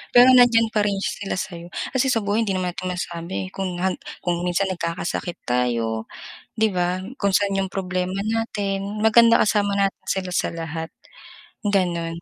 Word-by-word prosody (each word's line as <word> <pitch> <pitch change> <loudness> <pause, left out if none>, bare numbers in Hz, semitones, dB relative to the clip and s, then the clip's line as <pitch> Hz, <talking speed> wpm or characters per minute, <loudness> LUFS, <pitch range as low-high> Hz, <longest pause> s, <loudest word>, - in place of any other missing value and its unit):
pero 245 +1 +9
nandiyan 235 -3 +5
pa 215 - +2
rin 200 -1 +1
sila 200 - -3
sayo, 175 -2 -5 0.3
kasi 260 0 +2
sa 230 -4 +1
buhay 205 +3 +1
hindi 195 -2 -1
naman 180 -1 -1
natin 185 - -5
masabi 180 +1 -5
kung 185 -2 -3
han 190 -1 0 0.3
kung 175 -1 0
minsan 180 +2 +1
nagkakasakit 170 0 -3
tayo, 115 -3 -1 0.5
'di 220 0 +4
ba? 180 +1 0 0.2
Kung 200 -1 +1
sa'n 200 0 +2
yung 190 - -6
problema 185 0 -2
natin. 205 -2 -2
Maganda 230 +1 +6
kasama 205 -1 +2
natin 195 -1 0
sila 190 -1 -1
sa - - +1
lahat, 165 0 -5 0.7
gano'n. 170 -4 0
190 Hz, 160 wpm, -23 LUFS, 175-210 Hz, 0.7 s, pero